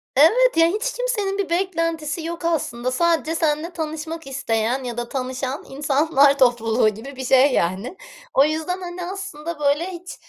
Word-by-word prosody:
Evet, 435 - +5
ya 330 - +6
hiç 430 +8 -1
kimsenin 430 -6 -1
bir 395 -4 -2
beklentisi 330 -3 -1
yok 335 +1 -5
aslında 255 -7 -1
sadece 330 +2 +1
seninle 320 +1 0
tanışmak 320 -1 -5
isteyen 255 -2 -1
ya 240 -2 -5
da 240 0 -4
tanışan 260 +1 -3
insanlar 285 0 +3
topluluğu 240 -3 +3
gibi 225 +7 -9
bir 260 0 -5
şey, 265 +2 +5
yani. 195 - -1 0.4
O 275 - +5
yüzden, 320 +4 -2
hani, 355 0 -6
aslında 345 -4 -6
böyle 295 +5 +1
hiç, 360 0 -9
310 Hz, 160 wpm, -22 LUFS, 265-340 Hz, 0.4 s, ya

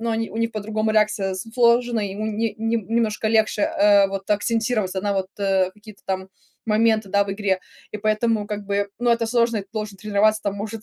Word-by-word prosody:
ну, 230 0 -1
они 225 0 -1
у - - -8
них 230 0 0
по-другому 215 +1 -2
реакция 210 -3 +1
с 185 - -4
сложена, 240 -1 +3
ему 205 +1 -3
не 220 +1 -1
не 225 +1 0
немножко 220 0 -1
легче, 220 -1 +2
э, 200 -1 +4
вот 195 +1 -6
акцентироваться 215 -2 0
на 205 -1 0
вот, 190 -1 -1
э, 190 -2 +1
какие-то 210 0 -15
там 190 0 -3 0.4
моменты, 220 -1 +2
да, 200 0 +3
в 195 - -5
игре. 195 -2 0 0.4
И - - -3
поэтому, 215 0 0
как 210 -1 -4
бы 200 0 0
Ну 240 0 +1
это 230 0 +2
сложно, 235 0 +2
и - - -2
ты 195 - -21
должен 210 -2 -4
тренироваться 215 +1 +2
там, 200 - -1
может, 215 +1 -6
215 Hz, 210 wpm, -22 LUFS, 200-225 Hz, 0.4 s, э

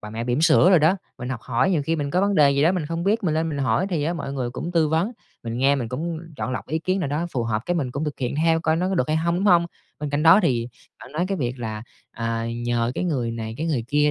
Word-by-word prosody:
bà 105 - -8
mẹ 115 +2 -4
bỉm 125 +3 0
sữa 165 +3 +5
đồ 180 - +7
đó, 160 +6 +3 0.2
mình 125 - -5
học 130 -3 -4
hỏi. 130 +9 +1
Nhiều 160 -5 +1
khi 165 +3 -1
mình 145 -2 -2
có 180 - +2
vấn 200 0 +1
đề 145 -4 +5
gì 140 +1 +2
đó 170 +4 +4
mình 170 -5 -2
không 165 +1 -3
biết, 210 +2 +1
mình 155 -3 +1
lên 160 +1 0
mình 145 -2 -3
hỏi, 140 +8 +1
thì 165 -5 0
á 165 - 0
mọi 150 -5 -5
người 130 -3 -3
cũng 170 +8 -5
tư 160 -3 +3
vấn, 165 +9 0 0.3
mình 115 +1 -4
nghe 140 +2 +4
mình 125 -5 -3
cũng 160 +7 -3 0.2
chọn 130 - -3
lọc 125 - -4
ý 155 +3 0
kiến 185 +4 -1
nào 155 - -1
đó 155 +4 -1
phù 125 - -1
hợp 110 -1 -1
cái 175 - 0
mình 140 -7 -1
cũng 140 +5 -3
thực 150 -2 -4
hiện 125 0 -2
theo 165 +1 +2
coi 160 -1 +1
nó 180 +2 0
có 190 - -1
được 130 -5 0
hay 155 - +2
hông, 170 +2 0
đúng 190 - -1
hông? 175 -4 +5 0.3
Bên 150 -1 -4
cạnh 145 +1 0
đó 165 +5 +7
thì 120 -2 +1 0.3
bạn 130 - -12
nói 170 +4 0
cái 195 - -1
việc 125 -1 -2
là, 110 -2 -5 0.3
à, 115 0 -2 0.2
nhờ 120 0 0
cái - - -2
người 130 -9 -1
này, 110 -1 -5
cái 160 - -3
người 135 -9 -1
kia 150 +1 +3
150 Hz, 315 wpm, -23 LUFS, 125-170 Hz, 0.3 s, đồ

